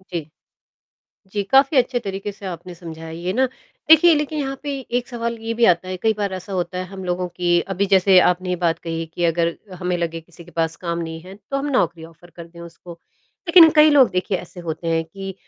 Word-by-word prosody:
जी, 170 -5 -7 1.0
जी, 200 +1 -3
काफ़ी 275 +2 +5
अच्छे 250 0 +2
तरीके 195 -2 -5
से 200 0 -13
आपने 180 0 -7
समझाया 165 -1 -9
ये 170 +3 -4
ना। 260 +4 +3 0.4
देखिए 320 +1 +8
लेकिन 300 +1 -2
यहाँ 270 -1 -3
पे 290 - -3 0.3
एक 245 - -12
सवाल 235 -1 -4
ये 225 0 -3
भी 235 0 +3
आता 180 -1 +2
है, 185 0 -4
कई 220 +4 +1
बार 200 -2 -3
ऐसा 185 +1 -7
होता 180 0 -3
है 185 - -2
हम 190 0 -9
लोगों 180 0 -2
की 175 0 +1
अभी 200 +2 0
जैसे 190 0 +6
आपने 180 +1 +1
ये 180 - +1
बात 165 -1 +1
कही 165 -1 -4
कि 175 - -3
अगर 170 0 0 0.2
हमें 180 0 -1
लगे 165 -1 -3
किसी 170 0 -16
के 175 - -16
पास 165 0 0
काम 170 0 -1
नहीं 160 -1 -5
है 185 +3 -12 0.2
तो 275 - 0
हम 275 - -3
नौकरी 170 - 0
ऑफर 165 +1 -17
कर 170 -1 -11
दें 170 0 -16
उसको। 170 +1 -11 0.5
लेकिन 335 -2 +8
कई 305 0 +7
लोग 275 -7 +5
देखिए 185 +1 -1
ऐसे 180 0 -11
होते 165 0 -5
हैं 165 0 +1
कि 195 +3 -8
180 Hz, 230 wpm, -21 LUFS, 170-220 Hz, 1.0 s, देखिए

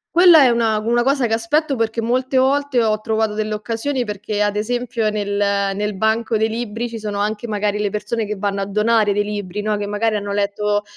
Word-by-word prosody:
Quella 345 -4 +8
è 255 - +5
una 230 -2 +1
una 230 +3 +1
cosa 270 +1 +1
che 225 - -1
aspetto 275 +6 0
perché 225 -1 -1
molte 255 +3 0
volte 270 -1 +2
ho 215 -1 0
trovato 220 -1 0
delle 215 0 -2
occasioni 240 +5 -2
perché, 210 0 -2
ad 205 0 0
esempio, 235 +1 -1
nel 210 -1 -3 0.5
nel 210 0 -2
banco 220 +3 0
dei 220 +1 +1
libri 230 +1 -3
ci 230 -1 -7
sono 210 -1 -4
anche 210 +3 -2
magari 210 -1 -1
le 210 -1 0
persone 210 +2 -3
che 210 - -3
vanno 200 0 -2
a 195 - -3
donare 210 +1 +2
dei 205 +1 +1
libri, 205 -1 -5
no, 215 0 0
che 205 0 -3
magari 215 +2 0
hanno 205 -1 -3
letto 205 +1 0
215 Hz, 215 wpm, -19 LUFS, 210-235 Hz, 0.5 s, Quella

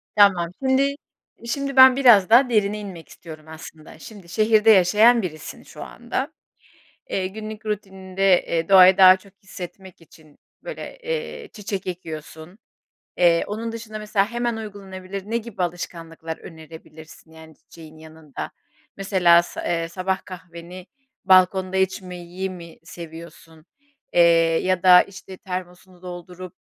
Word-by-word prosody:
Tamam, 190 -5 +4
şimdi, 275 +2 +1 0.5
şimdi, 275 +3 -3
ben 260 -1 +8
biraz 235 -8 +5
daha 250 +3 +5
derine 210 -2 0
inmek 190 -5 -10
istiyorum 155 -2 -13
aslında. 160 0 -12
Şimdi, 200 -4 -13
şehirde 215 +3 +3
yaşayan 215 +5 +5
birisin 155 -5 -8
şu - - -11
anda. - - -5 0.8
Eee, 190 -1 -1
günlük 215 +2 -9
rutininde, 190 -2 0
eee, 165 -1 -2
doğayı 190 -1 +7
daha 185 -1 +8
çok 195 +1 -20
hissetmek 190 -1 -11
için, 155 -2 -21 0.3
böyle, - - -8
eee, 475 -2 -5
çiçek 200 -2 -6
ekiyorsun. 160 0 -8 0.6
Eee, 170 -1 +3
onun 225 +2 -5
dışında 220 -1 -8
mesela 210 0 -1
hemen 240 -1 -2
uygulanabilir 195 -3 -8
ne 230 - 0
gibi 225 -5 -7
alışkanlıklar 165 -2 -6
önerebilirsin? 160 -1 -14
Yani, 160 0 -15
çiçeğin 160 +1 -16
yanında, 155 -2 -10 0.5
mesela 180 -3 +4
sa - - -8
eee, 165 -1 -1
sabah 190 +2 -3
kahveni 180 0 -11 0.4
balkonda 185 0 +3
içmeyi 185 -1 -3
mi 170 -3 -12
seviyorsun, 165 -1 -12 0.5
eee, 175 - +3 0.4
ya 185 -2 0
da 180 -1 +8
işte 190 -1 -12
termosunu 180 0 -9
doldurup, 180 0 -10
185 Hz, 130 wpm, -22 LUFS, 170-210 Hz, 0.8 s, ben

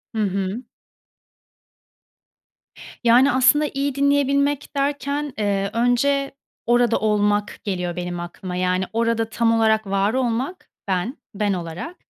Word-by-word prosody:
Hı 220 - 0
hı. 195 +4 -2 2.4
Yani, 250 +4 +5
aslında 260 +4 +4
iyi 275 0 -1
dinleyebilmek 280 0 +1
derken, 285 0 -1
eee, 200 -2 0
önce 275 +4 +1 0.3
"orada 240 -1 +3
olmak" 210 -1 0
geliyor 180 -3 -3
benim 175 0 -4
aklıma. 180 +1 -6
Yani, 185 +1 0
orada 230 0 0
tam 230 +1 +1
olarak 220 -1 +2
var 195 +3 +1
olmak, 260 +7 -2 0.2
ben, 195 +8 -1 0.2
ben 205 -1 0
olarak 175 - -6
230 Hz, 115 wpm, -22 LUFS, 195-275 Hz, 2.4 s, Yani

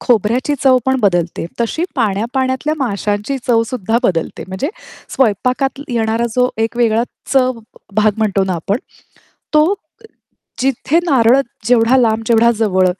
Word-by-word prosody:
खोबऱ्याची 245 +5 +1
चव 260 -2 +5
पण 265 0 +2
बदलते. 175 -6 0 0.2
तशी 235 +9 -1
पाण्या-पाण्यातल्या 260 +6 0
माशांची 210 +1 -2
चवसुद्धा 230 -1 +1
बदलते. 170 -8 -1
म्हणजे 190 +11 -3 0.5
स्वयंपाकात 255 +4 0
येणारा 230 -1 0
जो 250 0 +3
एक 225 +1 -2
वेगळा 230 -1 +2 0.3
चव 255 -2 +2 0.4
भाग 215 +1 +4
म्हणतो 200 -3 +1
ना 190 -1 -2
आपण, 195 +6 -2 0.8
तो 305 0 +6
अ, 405 +3 -11 0.6
जिथे 270 +4 +1
नारळ 260 -3 +4 0.3
जेवढा 240 +1 +4
लांब, 225 -3 +2
जेवढा 235 0 +4
जवळ 190 -4 +2
235 Hz, 130 wpm, -16 LUFS, 215-260 Hz, 0.8 s, तो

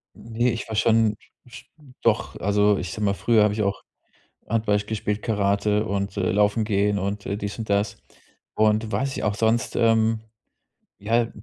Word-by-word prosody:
Ne, 115 +2 -1
ich 115 - -5
war 110 - -4
schon 110 -1 +3 0.3
sch 125 - -13 0.4
doch, 115 -1 +1
also 105 +1 +3
ich 90 - -5
sage 105 - -5
mal, 100 -1 +2
früher 110 0 +3
hab 105 - +2
ich 105 0 -1
auch 100 0 -2 0.7
Handball 110 -2 +1
gespielt, 105 0 -3
Karate 105 0 +1
und, 100 -1 -3
äh, 90 - 0
Laufen 105 +2 +2
gehen 100 -1 +1
und, 100 +1 -3
äh, 100 - -2
dies 100 +1 -5
und 110 - -5
das. 100 +1 0 0.6
Und 110 +1 +1
weiß 135 0 -1
nicht, - - -4
auch 105 -1 0
sonst 115 +1 0
ähm, 115 -1 +3 0.8
ja, 115 +3 +1
105 Hz, 175 wpm, -24 LUFS, 100-110 Hz, 0.8 s, schon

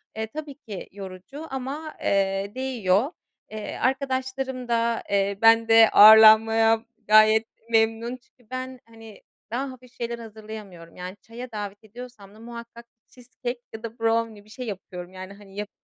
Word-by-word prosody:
Eee, 220 0 -3
tabii 295 +4 -8
ki 210 -9 -9
yorucu 195 - -9
ama, 275 +4 -5
eee, 195 0 0
değiyor. 250 - 0 0.4
Eee, 215 -1 -6
arkadaşlarım 260 -1 -2
da, 235 -1 0
eee, 200 0 +1
bende 225 0 +6
ağırlanmaya 220 +1 +7 0.2
gayet 215 +1 +6 0.2
memnun 225 +2 +1
çünkü 245 -2 -31
ben, 255 0 -5
hani, 225 -2 -14 0.3
daha 265 +3 -2
hafif 255 -1 -15
şeyler 235 -1 -5
hazırlayamıyorum. 215 -6 -10
Yani, 180 +2 -8
çaya 240 +2 -10
davet 205 -1 -6
ediyorsam 220 -2 -12
da - - -16
muhakkak 235 0 -10 0.2
cheesecake 245 0 -7
ya 220 +1 -9
da 230 0 -8
brownie, 225 -2 0
bir - - -21
şey 250 +4 -7
yapıyorum. 185 -3 -8
Yani, 185 +1 -9
hani, 200 -1 -16
yap 205 0 -5
225 Hz, 145 wpm, -25 LUFS, 205-250 Hz, 0.4 s, ağırlanmaya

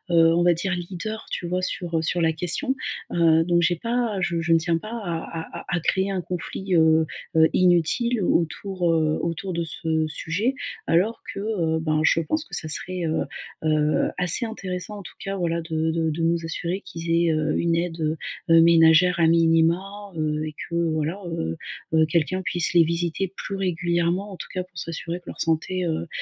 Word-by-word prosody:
heu, 165 0 +6
on 175 - +3
va 175 0 +5
dire 185 +3 -2
leaders, 185 +5 -5
tu 175 - -3
vois? 180 +1 -1
Sur, 175 -2 -2
heu, - - +1
sur 175 - 0
la 160 0 +2
question, 180 - +1 0.4
heu, 165 -1 +4
donc 175 -1 +3
j'ai 175 +1 +2
pas 230 -1 -1
je 170 -1 0
je 165 +1 -1
ne - - +6
tiens 165 +1 0
pas 215 - -9
à 170 -5 -5
à - - -16
à - - 0
créer 190 +3 +1
un 185 -2 -1
conflit, 180 +2 -3
heu 160 -1 +5 0.3
heu, 160 0 +6
inutile 185 +7 +2
au - - +3
autour, 180 +1 -2
heu, 155 -1 +1
autour 170 +2 -3
de 170 - -1
ce 160 0 -1
sujet 185 - -1 0.3
alors 195 +8 +2
que, - - -6
heu, 175 -7 0
ben, 155 -1 0
je 165 - +3
pense 310 - -1
que - - -5
ça 155 - +1
serait, 180 +4 -2
heu 160 0 0 0.4
heu, 155 -1 +2
assez 180 +7 +4
intéressant 195 -1 -5
en - - -9
tout - - -11
cas 195 0 -3
voilà, 170 -1 -1
de 160 0 -1
de 160 0 0
de 160 +2 -4
nous 170 0 +1
assurer 175 +4 -3
qu'ils 165 - -9
aient, 170 0 +3
heu, 155 0 0
une 170 -1 +1
aide, 170 -1 -2 0.5
heu, 165 0 +7
ménagère 170 +1 +5
à 165 - +5
minima, 170 +5 +2
heu, 155 0 -1
et 155 - -6 0.2
que 170 - -4
voilà, 165 +2 -1
heu, 80 - -3 0.5
quelqu'un 170 +4 0
puisse 175 0 0
les 170 - +7
visiter 170 +3 -1
plus 195 - -5
régulièrement 175 +1 0
en 190 - -9
tout - - -7
cas 185 -1 -2
pour 180 -2 -19
s'assurer 165 +1 -4
que 175 - -31
leur - - -6
santé, 170 +3 0
heu, 165 0 -2
170 Hz, 200 wpm, -24 LUFS, 160-185 Hz, 0.5 s, heu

